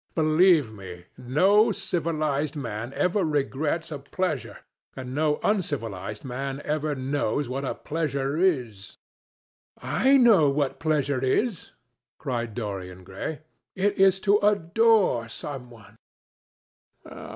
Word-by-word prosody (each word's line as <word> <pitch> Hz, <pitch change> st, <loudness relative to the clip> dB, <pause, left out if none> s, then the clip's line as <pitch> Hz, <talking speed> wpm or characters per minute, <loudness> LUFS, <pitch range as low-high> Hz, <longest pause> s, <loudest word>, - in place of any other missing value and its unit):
Believe 155 Hz, -5 st, +4 dB
me, 90 Hz, -4 st, -10 dB
no 195 Hz, -, +3 dB
civilized 155 Hz, -6 st, -2 dB
man 120 Hz, -4 st, -5 dB
ever 185 Hz, +2 st, +1 dB
regrets 150 Hz, +2 st, -1 dB
a 150 Hz, -, -5 dB
pleasure, 175 Hz, +5 st, -3 dB, 0.4 s
and 130 Hz, -1 st, -7 dB
no 150 Hz, +1 st, +1 dB
uncivilized 115 Hz, -, -2 dB
man 135 Hz, +2 st, -4 dB
ever 150 Hz, 0 st, -1 dB
knows 135 Hz, 0 st, -1 dB
what 135 Hz, +3 st, -4 dB
a 135 Hz, -, -3 dB
pleasure 145 Hz, -3 st, -2 dB
is." 125 Hz, -, -1 dB, 0.8 s
"I 270 Hz, +2 st, +3 dB
know 215 Hz, -, +5 dB
what 140 Hz, -1 st, -1 dB
pleasure 145 Hz, -4 st, 0 dB
is," 190 Hz, -, -1 dB, 0.4 s
cried 120 Hz, -4 st, -4 dB
Dorian 95 Hz, -5 st, -6 dB
Gray. 95 Hz, -, -6 dB, 0.3 s
"It 200 Hz, +2 st, +1 dB
is 190 Hz, -1 st, +4 dB
to 205 Hz, +1 st, +3 dB
adore 205 Hz, -, +2 dB
some 130 Hz, +1 st, -7 dB
one." 110 Hz, -3 st, -16 dB
145 Hz, 115 wpm, -25 LUFS, 125-175 Hz, 0.8 s, know